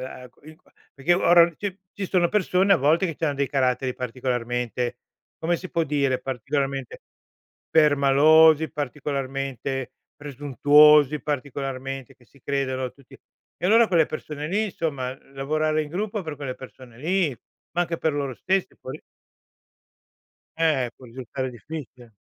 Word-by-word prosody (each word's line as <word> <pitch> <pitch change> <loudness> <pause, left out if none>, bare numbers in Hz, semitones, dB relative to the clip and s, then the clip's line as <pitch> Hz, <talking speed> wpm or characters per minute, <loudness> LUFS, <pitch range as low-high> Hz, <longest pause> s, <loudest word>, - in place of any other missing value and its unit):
la 130 -1 -8
q - - -30
il 155 +1 -13
qua - - -30 0.2
perché 140 +5 +1
ora 175 -1 +5
ci 200 -2 -4
ci 200 - -4
sono 175 -2 +2
persone 195 -1 +2
a - - +6
volte 155 +5 +2
che 165 -4 -5
c'hanno 155 -3 -1
dei 140 -1 -1
caratteri 130 -1 0
particolarmente 125 -1 -3 0.4
come 170 +2 0
si 185 - -9
può 165 - 0
dire, 140 -3 0
particolarmente 135 +1 -3 0.7
permalosi, 155 +1 +5
particolarmente 135 -2 -4 0.2
presuntuosi, 145 +1 +4
particolarmente 135 -2 -4
che 125 - -24
si 140 - -23
credono 130 -2 -2
tutti 140 -2 -18 0.4
e - - +2
allora 225 +4 +6
quelle 165 -4 +3
persone 150 -1 -6
lì 210 +4 +1
insomma, 140 -9 -3 0.2
lavorare 155 +3 0
in 150 - -8
gruppo 210 +4 -3
per 155 -3 -6
quelle 135 -3 -5
persone 125 -2 -13
lì 175 +2 +1 0.4
ma 175 +2 +1
anche 170 -1 -3
per 160 - 0
loro 140 -3 -2
stessi 190 +8 -1
può 130 - -9
ri - - -8 1.6
Ehm, 155 -7 +1
può 130 - -14
risultare 130 +2 -5
difficile. 125 -1 -10
145 Hz, 145 wpm, -24 LUFS, 130-160 Hz, 1.6 s, a